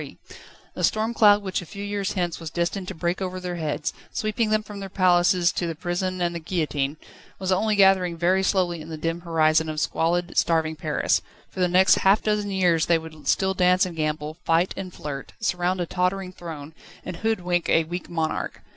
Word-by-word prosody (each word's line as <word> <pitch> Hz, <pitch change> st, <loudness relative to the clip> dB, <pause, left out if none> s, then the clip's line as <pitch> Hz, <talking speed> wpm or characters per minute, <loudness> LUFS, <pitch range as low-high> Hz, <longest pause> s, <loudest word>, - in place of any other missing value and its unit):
The -, -, -5 dB
storm 220 Hz, +2 st, +1 dB
cloud 205 Hz, -2 st, +5 dB
which 190 Hz, -1 st, -2 dB
a -, -, -9 dB
few 200 Hz, +4 st, -7 dB
years 205 Hz, -1 st, -2 dB
hence 175 Hz, -4 st, -2 dB
was 165 Hz, -2 st, -6 dB
destined 175 Hz, +3 st, -2 dB
to -, -, -5 dB
break 175 Hz, +3 st, -2 dB
over 185 Hz, -1 st, -3 dB
their 180 Hz, -1 st, -4 dB
heads, 150 Hz, -2 st, -2 dB, 0.2 s
sweeping 215 Hz, +1 st, -1 dB
them 215 Hz, 0 st, +1 dB
from 205 Hz, -1 st, -9 dB
their 195 Hz, -1 st, -6 dB
palaces 180 Hz, -1 st, +3 dB
to 175 Hz, -, -2 dB
the 165 Hz, -, -3 dB
prison 180 Hz, +2 st, -2 dB
and 175 Hz, 0 st, 0 dB
the 170 Hz, -, -4 dB
guillotine, 150 Hz, -4 st, -2 dB, 0.4 s
was 190 Hz, -1 st, -2 dB
only 210 Hz, +3 st, +2 dB
gathering 190 Hz, -3 st, +4 dB
very 180 Hz, +3 st, +2 dB
slowly 180 Hz, -3 st, +1 dB
in 155 Hz, -, -10 dB
the 160 Hz, -, -5 dB
dim 165 Hz, +2 st, -2 dB
horizon 160 Hz, -2 st, +2 dB
of 155 Hz, 0 st, -3 dB
squalid, 175 Hz, +3 st, 0 dB
starving 160 Hz, -1 st, +2 dB
Paris: 155 Hz, -1 st, 0 dB, 0.3 s
for -, -, -9 dB
the 180 Hz, -, +3 dB
next 185 Hz, +2 st, +5 dB
half 195 Hz, +3 st, +4 dB
dozen 210 Hz, -1 st, 0 dB
years 180 Hz, -4 st, +2 dB
they 170 Hz, -, +4 dB
would 155 Hz, -3 st, -10 dB
still 190 Hz, +5 st, +2 dB
dance 180 Hz, 0 st, +3 dB
and 180 Hz, -2 st, -6 dB
gamble, 155 Hz, 0 st, -2 dB
fight 165 Hz, +3 st, +2 dB
and 185 Hz, -1 st, -6 dB
flirt, 145 Hz, -4 st, -7 dB
surround 185 Hz, -3 st, 0 dB
a 175 Hz, -, 0 dB
tottering 180 Hz, +2 st, -1 dB
throne, 160 Hz, -4 st, -8 dB, 0.3 s
and 180 Hz, -2 st, -5 dB
hoodwink 180 Hz, -6 st, 0 dB
a 165 Hz, -, +4 dB
weak 175 Hz, +3 st, -6 dB
monarch. 160 Hz, -2 st, -3 dB
175 Hz, 200 wpm, -24 LUFS, 165-190 Hz, 0.4 s, cloud